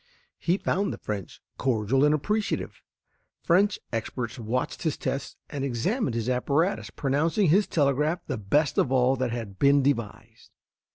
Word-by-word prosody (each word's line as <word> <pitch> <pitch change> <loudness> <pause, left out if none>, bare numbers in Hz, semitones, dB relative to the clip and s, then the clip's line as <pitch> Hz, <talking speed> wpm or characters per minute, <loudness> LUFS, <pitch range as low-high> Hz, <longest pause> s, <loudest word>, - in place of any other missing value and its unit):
He 175 +2 +1
found 200 0 0
the - - -5
French 100 -4 -6 0.2
cordial 125 +1 +1
and 150 - +5
appreciative. 210 +8 -1 0.6
French 195 +4 +3 0.2
experts 120 +2 -3
watched 120 +3 -2
his 160 -4 -1
tests 135 0 -3
and 140 -2 -4
examined 140 - -1
his 115 0 -2
apparatus, 140 +8 0
pronouncing 160 +7 +1
his 195 +6 +4
telegraph 150 +3 +1
the 130 -6 -3
best 140 +9 +1
of 130 - +2
all 130 0 +3
that 130 0 0
had 115 -5 -6
been 140 0 +5
devised. 115 -7 -3
140 Hz, 150 wpm, -26 LUFS, 120-160 Hz, 0.6 s, and